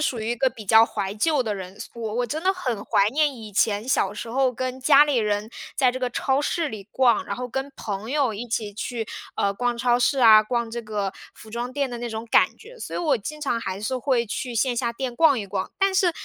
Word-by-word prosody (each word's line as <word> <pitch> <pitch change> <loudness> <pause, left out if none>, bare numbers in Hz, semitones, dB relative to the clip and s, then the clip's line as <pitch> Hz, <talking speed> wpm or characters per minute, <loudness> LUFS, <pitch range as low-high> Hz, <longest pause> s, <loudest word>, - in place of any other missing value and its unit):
属 260 -5 0
于 220 +1 -2
一 - - +1
个 265 +3 +3
比 230 -3 -11
较 220 +3 +7
怀 200 -3 -3
旧 285 +6 +2
的 215 -3 -2
人， 190 0 -8
所 - - -8
我 220 -2 -3
我 245 +1 0
真 305 +7 -4
的 375 - +3
很 250 - -3
怀 200 -2 +3
念 295 -2 +1
以 220 -3 -10
前 205 +2 +1
小 205 -6 +1
时 225 +2 -6
候 260 +1 +2
跟 255 +1 -4
家 275 +3 +7
里 290 -3 0
人 210 0 -1 0.3
在 255 -3 +3
这 260 - -4
个 250 - 0
超 265 +2 0
市 315 +1 -1
里 210 -2 -9
逛， 240 -3 +3
然 - - -3
后 250 - -4
跟 270 +3 -4
朋 205 +2 -5
友 280 -5 +1
一 220 +4 -6
起 220 -2 -2
去， 225 +2 -4 0.3
呃， 200 - +1
逛 240 +3 -1
超 240 0 +2
市 265 +2 +2
啊、 220 -3 +8
逛 235 +1 -2
这 235 +1 -4
个 210 -3 -3 0.2
服 220 - -14
装 240 +2 -4
店 280 +1 -1
的 240 - -5
那 240 0 -4
种 225 0 -5
感 - - +4
觉。 480 +3 -14
所 - - -6
以 - - -1
我 295 -8 +1
经 305 +9 -6
常 245 -6 -1
还 190 -3 -4
是 235 +5 -2
会 250 -2 +1
去 245 +2 -4
线 245 +2 +1
下 235 0 0
店 250 +1 -4
逛 295 -1 +4
一 205 - -5
逛。 190 -1 -3
但 390 0 +2
是， 375 -2 +4
240 Hz, 275 characters per minute, -24 LUFS, 215-265 Hz, 0.3 s, 啊